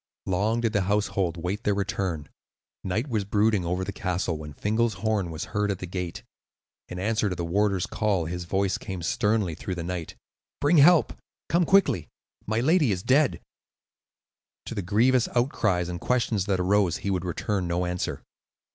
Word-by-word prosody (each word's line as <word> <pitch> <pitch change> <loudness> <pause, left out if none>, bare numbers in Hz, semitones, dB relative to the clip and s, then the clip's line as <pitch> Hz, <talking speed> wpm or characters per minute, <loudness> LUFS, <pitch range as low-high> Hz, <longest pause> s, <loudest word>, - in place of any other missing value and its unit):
Long 105 +5 +1
did 115 -2 0
the 100 - +2
household 100 -4 0
wait 90 +6 -3
their 105 - +1
return. 95 -6 -2 0.6
Night 105 +8 -1
was 110 -6 -1
brooding: 105 0 +2
over 90 +2 -1
the 95 - -3
castle 90 -3 -2
when 75 -1 -7
Fingal's 110 +3 0
horn 100 -2 -1
was 80 0 -5
heard 105 -1 +1
at 100 - -1
the 90 - -6
gate. 90 -1 -5 0.7
In 90 - -6
answer 105 +2 0
to 90 - -3
the 85 - -3
warder's 100 +1 +1
call 100 -6 0
his 90 +2 -4
voice 95 +1 0
came 95 -3 -6
sternly 105 0 +1
through 90 +4 -5
the 85 - -4
night: 85 -2 -5 0.4
"Bring 150 +4 +3
help, 165 +3 +6
and - - -13 0.3
come 170 +1 +3
quickly; 175 - +3 0.4
my 110 +2 +1
lady 155 - +3
is 90 -1 -2
dead." 140 +1 +3 1.2
To - - -5
the - - -2
grievous 115 +6 +3
outcries 105 -8 +1
and 85 -1 -5
questions 115 -6 +1
that 95 -2 +1
arose 95 -1 +2
he 100 - -3
would 90 -2 -1
return 90 +1 -2
no 85 +1 0
answer. 90 0 -3
100 Hz, 180 wpm, -26 LUFS, 90-110 Hz, 1.2 s, help